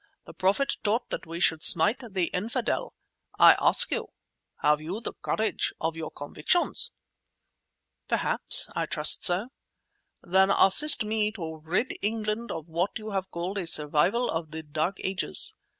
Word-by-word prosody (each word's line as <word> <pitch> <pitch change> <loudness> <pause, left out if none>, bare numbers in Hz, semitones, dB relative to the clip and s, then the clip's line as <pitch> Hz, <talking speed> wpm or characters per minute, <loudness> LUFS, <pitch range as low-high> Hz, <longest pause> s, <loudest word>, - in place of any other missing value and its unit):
The - - -13
Prophet 200 +9 -1
taught 225 +4 -2
that - - -6
we 165 +1 -7
should 160 -3 +1
smite 190 +11 +5
the 195 -8 -4
Infidel. 210 +6 -4 0.4
I - - +7
ask - - +6
you—have 150 0 -4
you 175 +7 -6
the 235 - -7
courage 220 - -3
of 160 0 -3
your 160 -1 -7
convictions?" 150 - -2 1.2
"Perhaps; - - +2
I - - -3
trust - - +3
so." 190 +7 +1 0.7
"Then 190 +2 +2
assist 230 +8 +6
me 215 0 -1
to 160 -6 -8
rid 185 +10 -2
England 215 +2 -4
of 160 -1 -7
what 170 +4 -3
you 215 0 -9
have 190 -1 -4
called 180 +4 -5
a 175 - -6
survival 160 +11 +1
of 160 -1 -5
the 160 +1 -8
dark 155 +5 -4
ages. 190 0 +1
190 Hz, 150 wpm, -25 LUFS, 160-215 Hz, 1.2 s, I